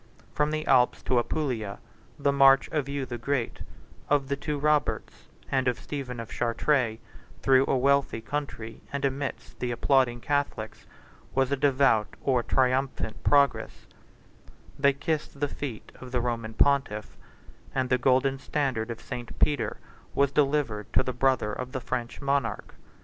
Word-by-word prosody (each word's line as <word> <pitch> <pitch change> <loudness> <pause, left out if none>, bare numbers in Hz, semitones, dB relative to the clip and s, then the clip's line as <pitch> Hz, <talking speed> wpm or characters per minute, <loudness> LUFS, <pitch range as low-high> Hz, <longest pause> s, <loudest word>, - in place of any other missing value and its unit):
From 150 0 +1
the 155 0 -2
Alps 125 -2 +3
to 125 - +2
Apulia 120 -7 -2 0.4
the 140 -1 +2
march 135 -1 +6
of 150 -3 -1
Hugh 140 -1 -2
the 120 -1 -6
Great, 125 0 -2 0.5
of 140 -2 +2
the 140 - +1
two 145 +1 -3
Roberts, 150 0 0 0.2
and 130 -1 +1
of 125 - +1
Stephen 130 -4 -5
of 115 - -7
Chartres, 120 -1 +1 0.5
through 135 0 +5
a 135 - +2
wealthy 140 -2 +2
country, 115 -3 -5
and 140 0 -1
amidst 135 0 -4
the 125 - -2
applauding 120 0 +2
Catholics, 140 -5 -2 0.5
was 135 0 +2
a - - +3
devout 130 -6 +2
or 130 -3 +2
triumphant 130 -2 0
progress: 140 -2 +2 0.9
they 140 0 +5
kissed 145 0 -3
the 145 - +1
feet 135 -6 -6
of 130 -1 -9
the 125 - +1
Roman 115 -2 -3
pontiff; 135 -7 +1 0.6
and 130 -1 0
the 125 - +4
golden 135 +2 +2
standard 130 -5 -1
of 115 -1 -5
St. 120 -3 -7
Peter 145 -4 +1 0.4
was 140 -1 +3
delivered 135 -7 0
to - - +4
the 130 - -3
brother 125 -4 +1
of 125 +3 -5
the 130 - -2
French 120 -1 -4
monarch. 140 0 -1
135 Hz, 155 wpm, -27 LUFS, 120-140 Hz, 0.9 s, march